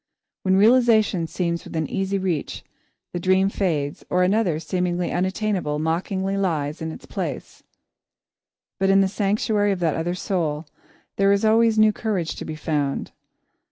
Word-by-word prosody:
When 190 0 +2
realisation 220 -5 +4
seems 170 0 -2
within 160 -2 -3
easy 195 +3 -1
reach, 180 -6 -3 0.5
the 175 - -2
dream 185 +2 +3
fades, 155 -8 -2
or 180 0 +2
another, 185 -4 +1
seemingly 180 0 -1
unattainable, 185 -4 -1
mockingly 190 +5 -1
takes 160 -5 -1
its 160 0 -6
place. - - -5 1.2
But 195 0 +2
in 195 0 +5
the 195 - +3
sanctuary 205 +1 +1
of 195 - -2
that 165 -3 +1
other 175 +2 -2
soul, 165 -5 -2 0.5
there 195 0 +4
is 200 +2 +2
always 225 0 +4
new 215 0 +5
courage 200 -8 -2
to - - -6
be 155 - -5
found. 150 -3 -2
185 Hz, 145 wpm, -23 LUFS, 165-200 Hz, 1.2 s, in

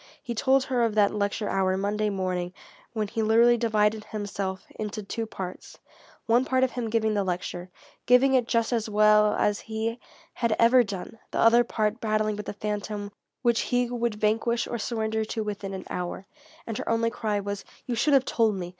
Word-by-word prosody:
He 240 - -4
told 265 +3 +3
her 255 -2 0
of 225 -2 0
that 205 -2 +4
lecture 205 0 -1
hour 190 -1 +1
Monday 210 +2 0
morning 185 -2 -2 0.4
when 215 -2 -1
he 225 - -3
literally 230 +2 +5
divided 215 -2 +1
himself 200 -3 -4
into 215 0 -4
two 225 +3 -4
parts, 185 -4 -8 0.5
one 235 +2 +3
part 260 0 +1
of 260 - +2
him 240 -3 -3
giving 220 -1 +1
the 205 -1 +1
lecture, 180 -1 -4 0.4
giving 250 +2 +5
it 250 -3 +3
just 230 0 +1
as 225 -2 -1
well 210 0 +5
as 210 0 +1
he 225 +2 -3 0.3
had 230 -2 0
ever 240 +2 +6
done, 200 +1 -7
the - - -5
other 235 +1 +6
part 215 0 -1
battling 215 -1 0
with 210 0 -7
the - - -3
phantom 210 0 -4 0.3
which 235 -2 +3
he 245 -1 +1
would 235 -2 -1
vanquish 220 +3 +1
or 235 - -4
surrender 220 0 -1
to 220 +1 -3
within 205 -2 -5
an 190 -1 -6
hour. 180 +1 -4 0.4
And 225 -2 -4
her - - -4
only 230 0 +1
cry 215 -3 -1
was: 200 0 -4 0.2
"You 245 - -2
should 280 +5 +3
have 265 -1 +4
told 225 -3 +2
me! 180 -2 -5
215 Hz, 195 wpm, -26 LUFS, 205-235 Hz, 0.5 s, ever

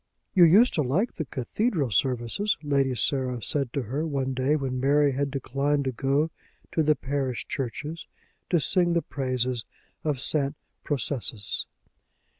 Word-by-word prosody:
"You 180 -2 +7
used 210 +10 +6
to 155 - +2
like 160 - 0
the 160 - -4
cathedral 140 - -1
services," 125 - +1
Lady 140 -3 +1
Sarah 130 -1 0
said 140 -5 0
to 140 - -1
her, 135 +7 -2
one 135 -4 -1
day, 130 +4 +1
when 130 -3 -2
Mary 145 +2 +3
had 140 +1 -1
declined 140 +1 0
to 130 - 0
go 140 +6 0 0.4
to 160 - +1
the 155 0 +3
parish 135 -2 -2
church, 135 +1 -4 0.6
to 175 - +3
sing 175 +5 +2
the 170 - +1
praises 130 -3 -2 0.4
of 150 -4 -1
St. 140 +2 0 0.3
Processus. 120 -6 0
140 Hz, 150 wpm, -26 LUFS, 130-150 Hz, 0.6 s, You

